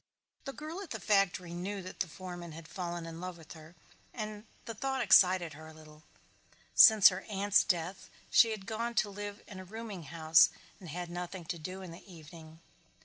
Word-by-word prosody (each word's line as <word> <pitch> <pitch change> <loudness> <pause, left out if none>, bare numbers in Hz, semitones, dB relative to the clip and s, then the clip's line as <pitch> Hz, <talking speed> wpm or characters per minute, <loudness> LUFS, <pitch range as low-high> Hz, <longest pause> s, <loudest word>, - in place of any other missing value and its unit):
The 275 - -5
girl 315 +6 -7
at 390 - -9
the 220 - -5
factory 185 -3 +1
knew 190 +3 -4
the 185 - -8
foreman 175 -1 -8
had 160 0 -10
fallen 175 -1 -5
in 165 0 -8
love 180 -1 -6
with 160 -1 -15
her 160 +1 -14 0.4
and 215 -2 -6 0.2
the 230 - -5
thought 265 +4 -2
excited 185 - +5
her 155 +2 -11
a 160 - -13
little. 155 -1 -15 0.7
Since 215 -3 +9
her 185 0 -5
aunt's 200 0 +3
death 175 +2 -2 0.2
she 230 - +6
had 215 -3 -5
gone 230 +2 -3
to 205 - +1
live 205 +1 -7
in 190 - -9
a - - -8
rooming 205 -3 -8
house 160 +1 +5 0.3
and 180 -4 -10
had 175 +2 -5
nothing 175 0 -6
to 170 - -5
do 185 +4 -7
in 180 - -9
the 175 +3 -13
evening. 160 0 -13
185 Hz, 195 wpm, -32 LUFS, 170-205 Hz, 0.7 s, Since